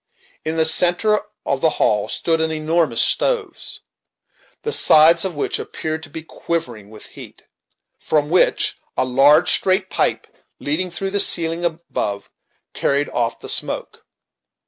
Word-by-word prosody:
In 160 +1 -3
the 160 - +3
centre 180 +6 +3 0.2
of 135 -1 -2
the 160 - +3
hall 105 -1 0
stood 165 -1 -1
an 160 0 -1
enormous 155 -5 +1
stove, 450 -8 -2 0.9
the 450 - -3
sides 165 - +5
of 190 -4 -4
which 145 - -2
appeared 155 0 -5
to 160 - -11
be 160 +2 -8
quivering 160 -11 -5
with 110 -1 -12
heat; - - -13 0.6
from 150 0 -1
which 180 - +2 0.2
a - - +1
large, 135 +4 +4
straight 190 0 0
pipe, - - -1 0.3
leading 165 +6 -2
through 195 +2 -5
the 205 - -1
ceiling 165 -2 +3
above, 160 - -4 0.4
carried 140 +1 -1
off 120 -1 -3
the - - -9
smoke. - - -2
160 Hz, 145 wpm, -19 LUFS, 145-175 Hz, 0.9 s, sides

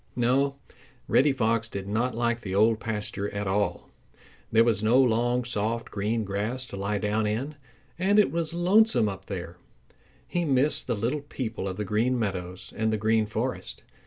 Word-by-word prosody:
No, 135 +3 +2 0.5
Reddy 145 +2 +4
Fox 115 -3 0
did 100 -2 -5
not 115 +4 0
like 120 0 0
the 95 -3 -4
Old 110 +2 +4
Pasture 105 -2 -3
at 100 0 -2
all. 100 +1 -1 0.6
There 115 +1 +6
was 115 -3 +2
no 115 +4 +4
long, 120 0 +2
soft 115 0 -2
green 110 +3 -1
grass 105 +6 -3
to 120 - -8
lie 100 +2 -1
down 105 +1 0
in. 125 +8 -2 0.5
And 195 +3 +3
it 210 - +5
was 165 -1 -1
lonesome 175 - +4
up 95 -1 -6
there. 90 -3 -6 0.7
He 175 - -1
missed 140 -1 +2
the 120 - 0
little 120 +8 -1
people 115 -8 -5
of 95 - -4
the 105 - -2
Green 115 +6 +1
Meadows 95 -3 -4
and 110 0 0
the 110 - 0
Green 110 0 +2
Forest. 105 - -4
115 Hz, 175 wpm, -27 LUFS, 105-125 Hz, 0.7 s, There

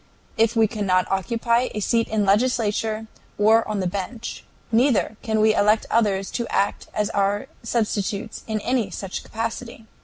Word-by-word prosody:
If 225 +1 +2
we 225 -1 +5
cannot 195 -4 +1
occupy 235 +5 +1
a - - -1
seat 230 +2 +1
in 220 -1 0
the - - +2
legislature 220 0 +1 0.3
or 220 +2 +4
on 210 -2 -2
the - - -1
bench, 200 +6 -5 0.3
neither 235 -2 +2
can 220 -3 0
we 215 0 +5
elect 215 +1 +3
others 200 -4 +1
to 235 -1 -2
act 200 +1 0
as 210 +1 -1
our 200 +1 +1 0.2
substitutes 215 -3 -2
in 220 -1 -1
any 240 -4 0
such 190 +1 -5
capacity. 230 +1 -5
220 Hz, 160 wpm, -23 LUFS, 205-230 Hz, 0.3 s, we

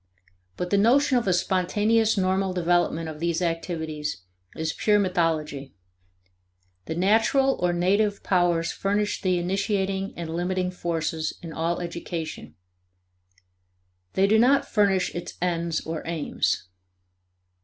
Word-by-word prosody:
But 180 0 -3
the 200 - +4
notion 255 +4 +4
of 235 - -5
a - - +4
spontaneous 205 +5 +2
normal 190 0 +1
development 175 -2 +1
of 155 -1 -7
these 170 0 0
activities 160 - -3 0.3
is 160 -1 -2
pure 210 -1 +2
mythology. 160 - -1 1.1
The 160 - -4
natural, 225 +9 +3
or 180 0 +2
native, 200 +4 +1
powers 175 -3 +2
furnish 205 +1 -1
the 185 -2 +1
initiating 195 +1 -1
and 165 -1 -5
limiting 180 +1 -1
forces 165 -3 -2
in 165 -2 -7
all 165 +2 -1
education; 170 -2 -6 1.6
they 190 - +3
do 215 +2 +4
not 265 +4 +4
furnish 195 -4 +2
its 175 - -6
ends 170 -2 -1
or 160 -1 -4
aims. 165 - -1
180 Hz, 120 wpm, -25 LUFS, 165-200 Hz, 1.6 s, the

